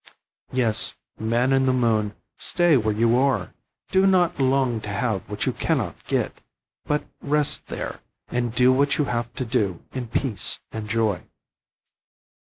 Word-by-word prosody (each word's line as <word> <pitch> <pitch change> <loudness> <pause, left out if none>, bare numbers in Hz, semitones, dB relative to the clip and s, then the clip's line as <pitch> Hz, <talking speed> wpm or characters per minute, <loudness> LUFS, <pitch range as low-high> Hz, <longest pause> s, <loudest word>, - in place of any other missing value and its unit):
Yes, 120 -4 +4 0.2
man 120 +4 +1
in 135 0 +3
the - - +4
moon, 110 -4 +1 0.2
stay 175 -3 +2
where 110 -4 +2
you 115 +2 +3
are. 130 -9 +1 0.4
Do 190 +1 +4
not 175 -3 +3
long 130 -3 +2
to 105 - -7
have 100 -1 -1
what 105 0 -2
you - - 0
can - - 0
not - - -4
get, - - -1 0.4
but 150 0 0 0.2
rest 150 0 +1
there, - - -5 0.3
and 120 -1 -1
do 125 +2 +4
what 140 +2 +2
you 150 - +2
have 120 -2 -2
to 130 - -3
do 105 -7 -1
in 130 -2 -5
peace 115 -2 -1
and 110 -1 -6
joy. 110 -5 +1
120 Hz, 160 wpm, -24 LUFS, 110-135 Hz, 0.4 s, Yes